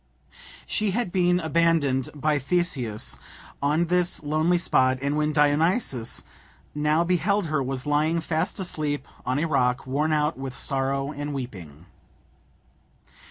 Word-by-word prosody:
She 215 -1 -1
had 240 -7 -1
been 180 -1 +3
abandoned 160 -5 +2
by 150 +1 +1
Theseus 135 -8 0 0.4
on 150 +4 +2
this 180 -1 +1
lonely 155 +4 +2
spot, 130 -7 +2
and, 140 +2 -1
when 150 0 +1
Dionysus 150 - +1 0.5
now 150 +2 +2
beheld 180 +3 +1
her, 155 -3 0
was 130 -1 -3
lying 155 +3 +2
fast 160 +4 -2
asleep 150 -6 -2 0.2
on 130 +2 +1
a 155 - +1
rock, 125 -4 +1
worn 145 +4 0
out 150 -2 +1
with 135 -1 -6
sorrow 135 0 -1
and 145 0 -5
weeping. 90 - -7
150 Hz, 130 wpm, -25 LUFS, 135-170 Hz, 0.5 s, been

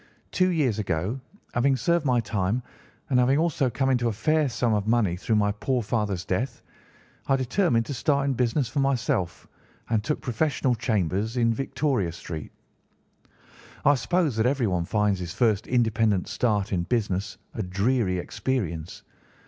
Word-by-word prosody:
Two 185 0 +2
years 140 - +1
ago, 100 +6 -2 0.3
having 135 +3 +3
served 170 +2 +1
my 125 -2 +3
time, 105 +1 -1 0.5
and 125 - +4
having 130 +3 +4
also 155 -5 +1
come 135 +3 0
into 120 -2 +2
a - - +1
fair 145 +8 +1
sum 120 -1 0
of 105 0 0
money 110 -6 +2
through 110 +5 -1
my 105 -1 +3
poor 120 +4 -1
father's 105 -4 -1
death, 115 +6 -2 0.6
I 135 - +4
determined 130 - +1
to 140 - -4
start 140 +2 +1
in 140 - +1
business 125 +2 +1
for 120 +5 -3
myself 120 -10 0 0.4
and 110 -2 +2
took 150 +6 -1
professional 130 +1 0
chambers 110 -1 -1
in 115 -1 +3
Victoria 135 - -1
Street. 80 -3 -7 1.3
"I 145 - +7
suppose 145 +2 +1
that 110 +2 +3
everyone 110 -11 0
finds 105 -1 +1
his 90 -1 -5
first 110 -5 +2
independent 110 -5 +2
start 105 -4 0
in 90 - +1
business 100 0 -1 0.2
a - - -3
dreary 100 +1 0
experience. 90 -5 -3
115 Hz, 155 wpm, -26 LUFS, 100-130 Hz, 1.3 s, I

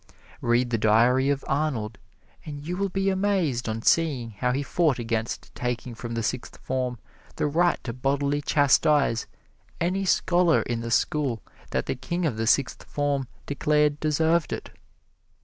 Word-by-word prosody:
Read 120 +1 +2
the 115 - +1
diary 120 +5 +4
of 140 -1 -1
Arnold, 135 -7 -1 0.4
and 145 -2 -7
you 175 +3 -3
will 195 +1 -1
be 195 +1 0
amazed 185 - 0
on 110 0 -3
seeing 140 -9 +2
how 125 +4 -1
he 135 +3 -1
fought 155 -2 +1
against 115 -1 -3
taking 125 0 -3
from 115 +1 -6
the 115 - -1
Sixth 125 +3 -3
Form 130 -2 -2 0.4
the - - -1
right 170 +4 +2
to 115 - -4
bodily 140 +3 0
chastise 145 -4 +3 0.5
any 185 +3 0
scholar 175 -2 +3
in 120 -1 -2
the 115 - -4
school 125 -1 0 0.3
that - - -1
the - - -1
king 170 +7 -3
of 140 -8 0
the 110 0 -2
Sixth 135 +3 +2
Form 145 -2 -1 0.2
declared 150 +1 +1
deserved 160 +2 +1
it. - - -5
140 Hz, 160 wpm, -26 LUFS, 120-155 Hz, 0.5 s, diary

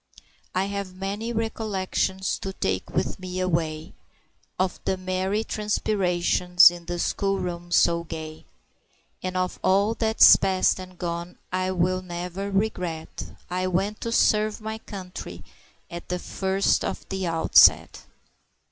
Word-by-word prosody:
"I 185 +1 +1
have 200 -2 -5
many 200 +5 -4
recollections 200 -4 -2
to 195 - -5
take 95 - -2
with - - -2
me 185 0 -5
away, 160 -4 -2 0.6
Of 185 -1 -1
the 190 - -1
merry 185 +3 -1
transpirations 180 -5 +3
in 175 -1 -10
the 175 0 -3
school 195 +3 0
room 175 -1 -5
so 170 0 +3
gay; 160 -1 -8 0.8
And 185 0 -3
of 185 0 -2
all 200 +3 +3
that's 220 -1 +6
past 190 -1 +1
and 185 -1 -10
gone 170 0 -5
I 185 0 -1
will 185 0 0
never 180 +2 -5
regret 180 -5 -2 0.2
I 185 +1 -2
went 195 +4 -1
to 230 - -3
serve 215 -2 +2
my 220 0 -5
country 185 -4 -8 0.4
at 170 0 -9
the 180 - -1
first 190 +2 0
of - - -4
the 190 -2 -2
outset!" 165 -1 +5
185 Hz, 135 wpm, -25 LUFS, 175-195 Hz, 0.8 s, that's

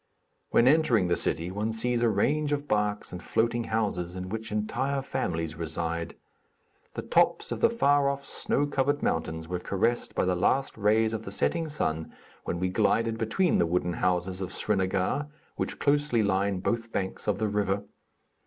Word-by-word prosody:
When 120 - +4
entering 130 - +4
the 85 - +3
city 85 +3 -1
one 105 +3 -2
sees 120 +2 0
a 120 - +4
range 145 +9 +1
of 145 0 -3
barks 105 -2 0
and 90 - -6
floating 115 +5 0
houses 100 -6 -1
in 90 0 -5
which 110 +1 -5
entire 130 +6 -1
families 80 -9 -2
reside. 85 0 -3 0.8
The - - -4
tops - - +2
of - - -2
the - - +5
far 145 -11 +3
off, 140 0 -4
snow 145 - 0
covered 145 0 0
mountains 80 0 -1
were 90 +1 -3
caressed 105 +6 -1
by - - +1
the 90 - +2
last 130 +10 +1
rays 110 +1 +2
of 110 - -2
the 100 - -7
setting 165 +9 0
sun, 80 - -2 0.3
when 85 - -2
we 90 +1 0
glided 115 +3 +1
between 130 - +2
the 85 - +3
wooden 90 +1 0
houses 90 +1 0
of 95 -1 -4
Srinagar, 100 +7 0 0.3
which - - -3
closely 145 -5 +2
line 100 -1 +1
both 115 +2 -2
banks 95 +1 -3
of 105 -2 +1
the 110 - 0
river. 100 -1 0
105 Hz, 175 wpm, -28 LUFS, 90-125 Hz, 0.8 s, the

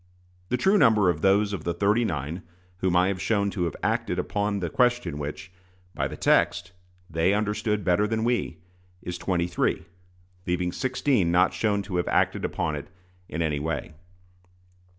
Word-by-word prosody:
The 125 - +1
true 195 +10 +3
number 105 - +5
of 80 -2 -6
those 100 +1 +3
of 90 -6 -4
the 85 0 -2
"thirty 105 +6 +2
nine" 80 -2 -3 0.4
whom 90 -1 0
I 90 +2 +4
have 95 -2 -3
shown 100 -2 +1
to 90 -3 -1
have 85 - -3
acted - - 0
upon 105 0 -1
the 90 - -2
question 120 - +1
which, 75 +6 -6 0.4
by - - -1
the - - -8
text, 85 0 +2 0.4
they 85 +4 +1
understood 105 0 -1
better 90 +4 +2
than 110 0 -1
we, 120 -8 0 0.5
is 90 0 -5
twenty 85 -1 0
three, 85 -2 -1 0.6
leaving 90 0 0
sixteen 130 -6 +1
not 90 +2 +3
shown 100 -2 0
to 95 -3 -4
have 90 - -1
acted - - +1
upon 75 - -1
it 70 - -7 0.4
in 85 +2 -2
any 75 -3 -1
way. 80 +1 -3
95 Hz, 170 wpm, -26 LUFS, 85-105 Hz, 0.6 s, number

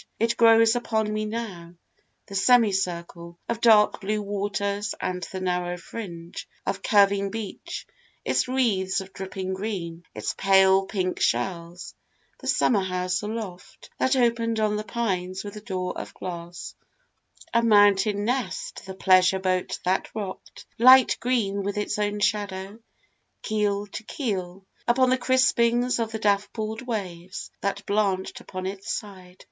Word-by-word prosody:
It 230 +1 +1
grows 225 0 +6
upon 220 -3 -1
me 215 0 -1
now 195 -6 -6 0.5
the - - -12
semicircle 190 -6 +1
Of 235 -1 -3
dark 215 -3 +5
blue 210 +1 -1
waters 205 0 -2
and 180 0 -3
the 190 - -4
narrow 180 -1 -1
fringe 175 -3 -8 0.2
Of 195 - -2
curving 200 -1 +3
beach 215 -2 -6 0.4
its - - +1
wreaths 210 -8 +1
of 190 0 -9
dripping 190 0 -5
green 185 -4 -4
Its - - -3
pale 190 0 +4
pink 185 -3 -2
shells 175 -1 -2 0.5
the - - -9
summer 210 -5 +3
house 185 0 -1
aloft 210 -4 -7
That 260 +1 +2
open'd 230 -2 +1
on 215 -1 +1
the 210 - -2
pines 190 -5 -2
with 205 0 -8
doors 185 -4 -3
of - - -7
glass, 175 -1 -7 0.8
A 235 - +4
mountain 205 -2 +4
nest 240 -6 -3
the 190 - -7
pleasure 185 0 +4
boat 185 -1 -1
that 185 +1 +1
rock'd 200 -4 -7
Light 255 +1 +8
green 220 -5 0
with 200 +1 -3
its 210 0 -2
own 205 0 -1
shadow, 200 0 -1 0.6
keel 205 -1 0
to 205 - -7
keel, 195 - -4 0.2
Upon 255 +1 +4
the 255 - +3
crispings 245 -1 +2
of 225 -1 -1
the 220 - -3
dappled 215 +2 -1
waves 190 -7 -5
That 200 0 -2
blanched 200 -2 0
upon 185 0 -7
its 195 +1 -5
side. 185 -3 -7
200 Hz, 140 wpm, -25 LUFS, 185-220 Hz, 0.8 s, Light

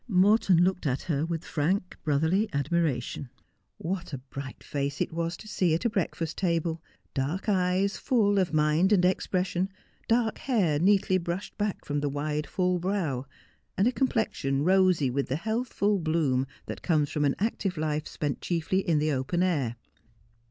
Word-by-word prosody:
Morton 195 -3 +4
looked 185 -3 0
at 135 0 -1
her 155 -1 -1
with 165 -1 -3
frank, 180 +5 -1
brotherly 160 +8 +2
admiration. 140 -3 -1 0.5
What 175 -2 -4
a - - -2
blight 130 +1 -9
face 140 0 -3
it - - -1
was 170 +1 -2
to 215 - -12
see 180 -6 +1
at 170 - -3
a 235 - +2
breakfast 170 -5 -2
table! 170 -3 0 0.2
— - - -41
dark 145 +10 -2
eyes 190 0 +1
full 205 -6 +2
of 185 -2 +1
mind 155 +5 +3
and 185 -4 +5
expression 185 0 0 0.2
— - - -35
dark 230 -1 +1
hair 190 - +1
neatly 190 +1 +3
brushed 175 +3 -4
back 205 -1 -2
from 145 0 -1
the 145 0 -1
wide, 150 +2 -2
full 180 -1 0
brow, 170 -9 -1 0.5
and 195 +4 +4
a - - +3
com 265 +1 +1
plexion 140 - -1
rosy 185 -7 +4
with 140 +2 -1
the 130 - -1
healthful 215 +1 0
bloom 155 -6 +1 0.2
that - - -6
comes 155 -4 +1
from 150 - 0
an 140 -1 +2
active 195 -3 -1
life 155 0 -1
spent 145 -3 -3
chiefly 175 +2 0
in 170 -5 +1
the 155 +1 +1
open 140 +6 0
air. 140 -11 0
170 Hz, 175 wpm, -28 LUFS, 150-190 Hz, 0.5 s, and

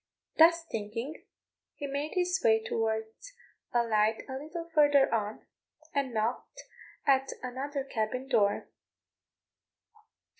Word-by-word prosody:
Thus 335 +1 +6
thinking, 230 +7 -5 0.5
he 290 - -5
made 285 +4 -3
his 360 +1 +1
way 220 -1 +4
towards 220 - -3 0.4
a 240 -1 +3
light 220 -1 +1
a 265 - -6
little 315 +5 -6
further 290 -4 +5
on, 215 -1 -2 0.5
and 275 -2 0
knocked 225 +2 -3 0.4
at 270 -1 +3
another 270 +3 -3
cabin 255 +1 -3
door. 210 -6 +2
260 Hz, 110 wpm, -30 LUFS, 220-290 Hz, 0.5 s, Thus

